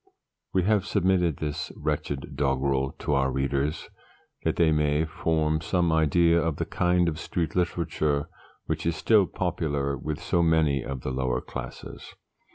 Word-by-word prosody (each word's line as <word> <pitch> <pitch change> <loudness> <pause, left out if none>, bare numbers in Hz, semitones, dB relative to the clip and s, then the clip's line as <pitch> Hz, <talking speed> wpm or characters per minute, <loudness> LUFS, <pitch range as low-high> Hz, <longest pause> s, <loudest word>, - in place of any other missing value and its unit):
We 95 -1 +2
have 105 0 +2
submitted 90 -4 +2
this 75 -2 -4
wretched 70 -2 -3
doggrel 70 -1 0
to 75 - -2
our 70 -1 +2
readers, 70 +3 -1 0.6
that - - +1
they 85 -2 +3
may 75 0 +2
form 80 -1 0
some 85 0 +1
idea 85 +2 +3
of 80 -2 -1
the - - -2
kind 90 0 +2
of 80 -1 -2
Street 85 -2 -3
Literature 80 -4 0 0.4
which - - -2
is 85 - +1
still 100 +3 +4
popular 70 -6 -1
with 75 +3 -4
so 85 0 +1
many 80 -5 +2
of 70 -2 -5
the 65 - -3
lower 65 -1 0
classes. - - -8
80 Hz, 155 wpm, -26 LUFS, 70-85 Hz, 0.6 s, still